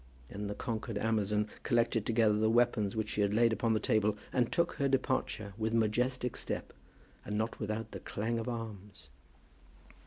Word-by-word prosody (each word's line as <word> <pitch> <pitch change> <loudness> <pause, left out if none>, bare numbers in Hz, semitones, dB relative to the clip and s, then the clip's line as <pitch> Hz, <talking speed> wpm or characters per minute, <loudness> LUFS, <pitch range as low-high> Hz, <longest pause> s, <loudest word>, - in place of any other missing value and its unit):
Then 100 0 -5
the 105 - -4
conquered 115 -1 -3
amazon 105 -1 +1
collected 115 -2 +1
together 110 -2 +4
the 110 +1 +2
weapons 115 -3 +2
which 110 -1 -1
she 105 - 0
had 100 0 +2
laid 115 0 +4
upon 115 0 +1
the 110 - +2
table, 110 -3 +2 0.2
and 125 -2 +2
took 170 0 +2
her 140 - +2
departure 130 -6 0
with 110 +1 0
majestic 125 +3 +1
step, - - -4 0.5
and 105 - -3
not 110 +1 -2
without 110 0 -3
the 100 - -6
clang 115 +5 -2
of 115 - -3
arms. 105 - -7
110 Hz, 175 wpm, -33 LUFS, 105-120 Hz, 0.5 s, together